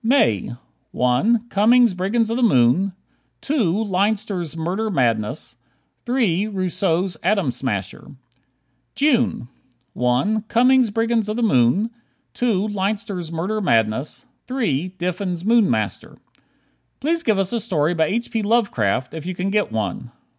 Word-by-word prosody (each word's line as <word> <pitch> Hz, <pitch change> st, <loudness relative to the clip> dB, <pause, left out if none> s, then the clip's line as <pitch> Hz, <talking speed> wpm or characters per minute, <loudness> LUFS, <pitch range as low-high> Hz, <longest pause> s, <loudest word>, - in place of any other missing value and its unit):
May: 225 Hz, -, +2 dB, 0.4 s
1 215 Hz, -, +1 dB
Cummings' 235 Hz, +2 st, +4 dB
"Brigands 215 Hz, +5 st, 0 dB
of 230 Hz, -, -1 dB
the -, -, -1 dB
Moon"; 185 Hz, -, +3 dB, 0.5 s
2 220 Hz, -, 0 dB
Leinster's 195 Hz, -4 st, -1 dB
"Murder 185 Hz, +7 st, -2 dB
Madness"; 125 Hz, -, -1 dB, 0.5 s
3 215 Hz, -6 st, +1 dB
Rousseau's 185 Hz, -2 st, -1 dB
"Atom 190 Hz, -6 st, +1 dB
Smasher." 120 Hz, +3 st, -5 dB, 0.8 s
June: 245 Hz, -, +1 dB, 0.5 s
1 130 Hz, -, +1 dB
Cummings' 250 Hz, +1 st, +4 dB
"Brigands 225 Hz, 0 st, 0 dB
of 215 Hz, -, -2 dB
the 240 Hz, -, -1 dB
Moon"; 190 Hz, -, +2 dB, 0.4 s
2 215 Hz, -4 st, 0 dB
Leinster's 200 Hz, -4 st, -3 dB
"Murder 190 Hz, +7 st, -2 dB
Madness"; 115 Hz, -, 0 dB, 0.2 s
3 195 Hz, -, -1 dB
Diffin's 180 Hz, 0 st, -3 dB
"Moon 230 Hz, -2 st, +4 dB
Master." -, -, -3 dB, 0.8 s
Please 330 Hz, +4 st, 0 dB
give 220 Hz, -9 st, +1 dB
us 195 Hz, +2 st, -1 dB
a 235 Hz, -, 0 dB
story 165 Hz, -5 st, 0 dB
by 160 Hz, -2 st, +2 dB
H. 235 Hz, +6 st, -2 dB
P. 225 Hz, -, -1 dB
Lovecraft, 200 Hz, -, 0 dB
if 160 Hz, +1 st, -7 dB
you 185 Hz, -, -4 dB
can 185 Hz, +2 st, -2 dB
get 210 Hz, 0 st, 0 dB
one. 110 Hz, +2 st, -3 dB
195 Hz, 130 wpm, -21 LUFS, 160-225 Hz, 0.8 s, Cummings